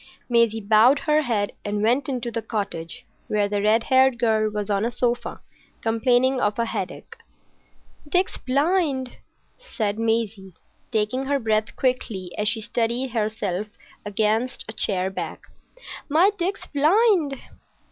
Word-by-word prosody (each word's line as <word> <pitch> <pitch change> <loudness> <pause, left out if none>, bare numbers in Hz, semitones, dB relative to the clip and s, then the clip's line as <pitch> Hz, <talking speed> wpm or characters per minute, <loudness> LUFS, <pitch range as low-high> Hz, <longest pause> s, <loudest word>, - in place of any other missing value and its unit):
Maisie 235 -2 +3
bowed 220 +6 +5
her 305 +1 +2
head 220 -7 -1
and 205 0 -2
went 250 +6 +2
into 245 -3 -3
the 230 - -2
cottage, 200 -7 -5 0.2
where 210 -1 +1
the 205 0 -1
red 220 +2 +3
haired 260 -1 +4
girl 220 -2 +2
was 210 -1 -4
on 200 -1 0
a 235 - +1
sofa, 240 0 -2 0.4
complaining 245 +3 +2
of 210 0 0
a 235 - +1
headache. - - -5 0.9
"Dick's 360 +4 0
blind!" 280 -2 0 0.4
said 220 - -3
Maisie, 220 -5 -1 0.4
taking 225 +4 0
her 280 +1 +1
breath 220 -3 0
quickly 225 -8 -1
as 210 - -1
she 225 +1 +1
steadied 235 +4 -1
herself 210 -3 -2 0.4
against 220 +4 -1
a 220 - -4
chair 190 -3 0
back. - - -6 0.7
"My 340 +8 +5
Dick's 385 +1 -3
blind!" 320 0 +3
230 Hz, 135 wpm, -23 LUFS, 210-265 Hz, 0.9 s, bowed